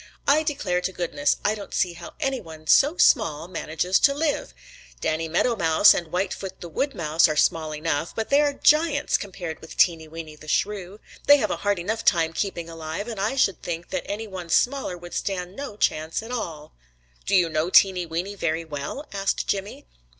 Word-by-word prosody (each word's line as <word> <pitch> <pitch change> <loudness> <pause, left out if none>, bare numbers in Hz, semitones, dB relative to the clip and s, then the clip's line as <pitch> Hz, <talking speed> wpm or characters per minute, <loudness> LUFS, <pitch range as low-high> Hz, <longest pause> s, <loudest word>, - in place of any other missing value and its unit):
I 295 +2 +5
declare 280 - -1
to 190 - -2
goodness, 165 -6 0
I 210 - +3
don't 205 -2 -7
see 180 -2 +1
how 170 0 -11
any 270 -2 -1
one 160 -4 -12
so 290 - +4
small 165 - +3
manages 180 0 0
to 280 -1 +4
live! 295 - -1 0.5
Danny 160 - -1
Meadow 205 +9 +1
Mouse 165 +1 +6
and 170 - -3
Whitefoot 190 +2 -3
the 175 - -8
Wood 275 - -2
Mouse 160 +1 +3
are 155 - -1
small 155 +1 +1
enough, 155 +1 -2
but 225 - -3
they 285 +1 +5
are 290 -1 +2
giants 300 +1 +2
compared 180 -5 -4
with 160 - -11
Teeny 165 -3 +3
Weeny 160 -1 -9
the 155 0 -15
Shrew. 200 +3 -2 0.3
They 290 - +9
have 215 -6 -1
a - - -1
hard 205 -1 0
enough 220 +6 -3
time 165 -3 +3
keeping 170 -3 -3
alive, 165 +4 -6
and 225 -4 -5
I 215 +7 0
should 200 -8 +1
think 170 0 -5
that - - -4
any 210 +2 -3
one 185 -5 -8
smaller 250 -3 +1
would 175 0 -11
stand 185 -1 -3
no 275 -7 -7
chance 160 +1 0
at 230 - -9
all." 160 -11 -5 0.5
"Do 195 - +2
you 180 -3 +5
know 155 +1 -1
Teeny 185 -2 +4
Weeny 175 +5 -3
very 165 -4 -2
well?" 150 - -6
asked 195 0 -1
Jimmy. 195 - -3
180 Hz, 200 wpm, -24 LUFS, 165-215 Hz, 0.5 s, They